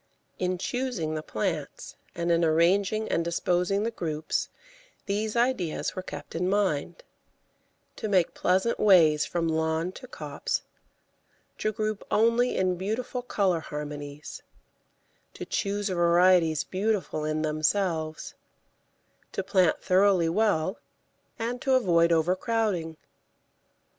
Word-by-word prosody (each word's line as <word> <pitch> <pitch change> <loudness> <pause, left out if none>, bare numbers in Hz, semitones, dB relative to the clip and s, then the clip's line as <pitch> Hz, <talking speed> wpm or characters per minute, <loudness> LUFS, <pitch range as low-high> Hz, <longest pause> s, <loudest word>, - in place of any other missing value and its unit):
In 185 0 0
choosing 235 -6 -2
the 155 - -3
plants 165 -4 -4 0.2
and 170 0 -1
in 170 0 +3
arranging 190 +7 +2
and 165 - 0
disposing 180 +3 0
the 230 - -1
groups 155 -7 -3 0.6
these 210 +2 -2
ideas 235 -9 0
were 185 - -3
kept - - -9
in 180 +2 -1
mind: 195 - -1 0.9
to 220 - -3
make 185 -4 +2
pleasant 190 +6 +1
ways 160 -7 +5
from 170 -1 -1
lawn 160 +2 0
to 255 +7 -11
copse; - - -4 1.0
to 215 - 0
group 215 -1 -3
only 230 +3 +2
in 185 -1 +1
beautiful 225 +6 -3
colour 195 -8 0
harmonies; 150 -1 -7 0.9
to - - -6
choose 205 0 -2
varieties 175 -3 +4
beautiful 195 -5 -1
in 155 0 -1
themselves; 155 - -1 1.0
to 195 - -2
plant 185 -3 +2
thoroughly 185 -2 +3
well, 190 -2 +1 0.6
and 240 +2 -3
to 265 -3 +2
avoid 170 -8 +3
overcrowding. 180 0 0
185 Hz, 115 wpm, -27 LUFS, 160-210 Hz, 1.0 s, ways